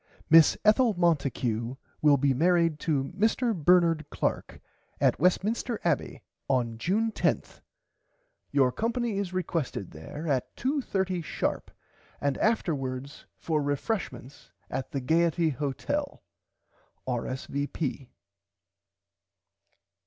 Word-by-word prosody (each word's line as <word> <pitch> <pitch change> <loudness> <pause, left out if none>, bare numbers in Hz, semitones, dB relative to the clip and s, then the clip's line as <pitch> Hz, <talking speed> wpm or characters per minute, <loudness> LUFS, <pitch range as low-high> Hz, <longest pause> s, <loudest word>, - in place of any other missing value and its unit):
Miss 165 -2 +7
Ethel 220 0 +4
Monticue 130 -8 0 0.3
will 150 -2 +5
be 140 0 +2
married 165 +1 +2
to 145 -2 -1
Mr 225 +3 +2
Bernard 170 -1 +4
Clark - - -2 0.4
at - - +2
Westminster 215 +5 +1
Abbey 170 -5 -1 0.3
on 120 -4 0
June 215 - +1
10th. - - -1 0.9
Your 135 -3 +3
company 230 - -1
is 195 -3 -3
requested 165 - -3
there 110 - -8
at 135 -4 -1
2 275 +3 0
30 190 -6 -1
sharp 160 - -2 0.5
and 140 -1 0
afterwards 140 - -1
for 155 -2 -1
refreshment 145 - -3 0.2
at 130 - -3
the 135 - -3
Gaierty 165 +3 +2
Hotel. 150 - -3 0.8
R.S.V. 135 +2 -3
160 Hz, 100 wpm, -28 LUFS, 135-190 Hz, 0.9 s, Miss